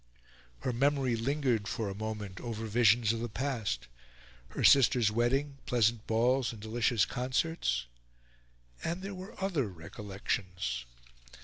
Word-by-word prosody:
Her 125 - -1
memory 135 -1 +2
lingered 120 -3 0
for 110 +1 -2
a 100 - -3
moment 105 -2 -5
over 115 -2 -4
visions 115 0 +4
of 115 - -3
the 120 +1 -3
past: 110 - -2 0.6
her - - -4
sister's 125 -5 +6
wedding, 135 +5 0
pleasant 115 -4 +2
balls 120 +3 +2
and 115 - -10
delicious 110 0 +1
concerts 125 - -1 1.0
and 175 +3 -2
there 200 +1 -4
were 190 +3 -9
other 175 - 0
recollections. 90 - -4
115 Hz, 125 wpm, -31 LUFS, 105-135 Hz, 1.0 s, sister's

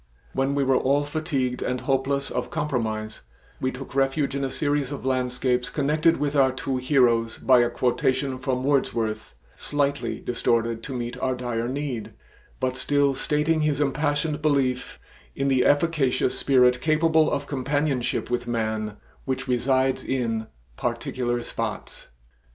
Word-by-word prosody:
When 135 +1 0
we 140 - +2
were 135 -1 +3
all 140 +3 +2
fatigued 145 -4 -2
and 125 0 -2
hopeless 135 +1 0
of - - -2
compromise, 110 -7 -2 0.4
we 130 - 0
took 130 +1 -9
refuge 135 +1 +1
in 140 - -1
a 135 - 0
series 145 -1 0
of 140 - -6
landscapes 125 -1 0
connected 155 +3 +2
with 145 0 -1
our 135 -2 +5
two 130 0 -3
heroes 125 -4 +2
by 130 -1 +5
a 120 0 +3
quotation 130 +2 0
from 130 -1 -1
Wordsworth 115 - 0 0.2
slightly 145 - -1
distorted 115 -1 0
to 135 +2 -6
meet 120 +1 -4
our 130 0 0
dire 120 -2 -2
need, 130 -4 -4 0.5
but 130 0 -1
still 145 0 +2
stating 150 +4 +1
his 150 -2 +1
impassioned 150 +2 0
belief 135 -4 0 0.4
in 140 0 0
the 130 -2 +3
efficacious 145 -4 +2
spirit 125 -2 +3
capable 160 0 +3
of 140 0 -2
companionship 140 -2 -1
with 120 0 -1
man 110 -2 -2 0.3
which 135 0 -2
resides 130 +1 +1
in 115 -4 -1 0.3
"particular 120 -1 -2
spots." - - -5
130 Hz, 145 wpm, -25 LUFS, 125-145 Hz, 0.5 s, our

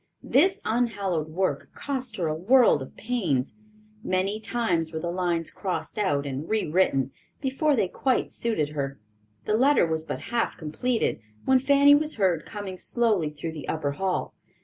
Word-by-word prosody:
This 380 +9 +3
unhallowed 200 -9 0
work 185 +4 -1
cost 260 -5 -3
her 175 - -1
a 155 - 0
world 215 - +4
of 130 - -9
pains. 185 - -1 0.5
Many 190 +3 0
times 180 -9 -1
were 160 - -3
the 170 +1 -3
lines 175 -2 -1
crossed 180 -1 -4
out 145 -9 +1
and 140 +3 -5
rewritten, 160 - +1 0.3
before 280 +2 +1
they 210 -6 +1
quite 260 +7 0
suited 190 -11 0
her. 140 -2 -4 0.5
The 210 - +1
letter 270 -1 +4
was 160 -1 0
but - - -4
half 235 - 0
completed, 225 +10 -1 0.3
when 265 0 +5
Fanny 280 +2 +6
was 300 +1 +2
heard 180 -7 +1
coming 200 -3 -6
slowly 215 -10 +1
through 150 +2 -6
the 150 -4 -8
upper 155 -3 -1
hall. 185 +5 -2
190 Hz, 160 wpm, -26 LUFS, 160-240 Hz, 0.5 s, Fanny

